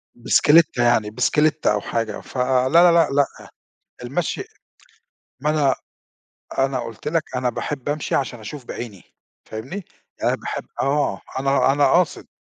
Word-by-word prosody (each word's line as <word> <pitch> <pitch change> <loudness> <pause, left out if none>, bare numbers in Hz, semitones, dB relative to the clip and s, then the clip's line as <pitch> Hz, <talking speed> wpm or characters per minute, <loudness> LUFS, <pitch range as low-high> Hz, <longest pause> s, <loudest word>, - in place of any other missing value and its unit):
بِسْكِليتَّة 145 +2 +4
يعني 110 -3 +3
بِسْكِليتَّة 150 +3 +2
أو 105 - -1
حاجة، 115 -3 -3
ف - - -11
لا، 130 0 +2
لا، 170 +2 +7
لا، 170 -2 +4
لأ، 140 0 +3 0.8
المشي 140 +7 -2 1.0
ما 150 +2 +1
أنا 145 -4 +2 0.8
أنا 135 -1 +1
قُلت 115 +3 -7
لك 160 0 +1
أنا 125 0 0
باحب 140 +3 -4
أمشي 150 0 -1
عشان 125 -3 -2
أشوف 130 +3 -8
بعيني، 105 -8 -7 0.4
فاهمني؟ 135 - -7 0.4
أنا - - +2
باحب - - -5 0.2
آه، 140 -7 0 0.2
أنا 135 0 +3
أنا 145 0 +3
قاصد. 175 -1 +1
135 Hz, 140 wpm, -22 LUFS, 120-150 Hz, 1.0 s, لا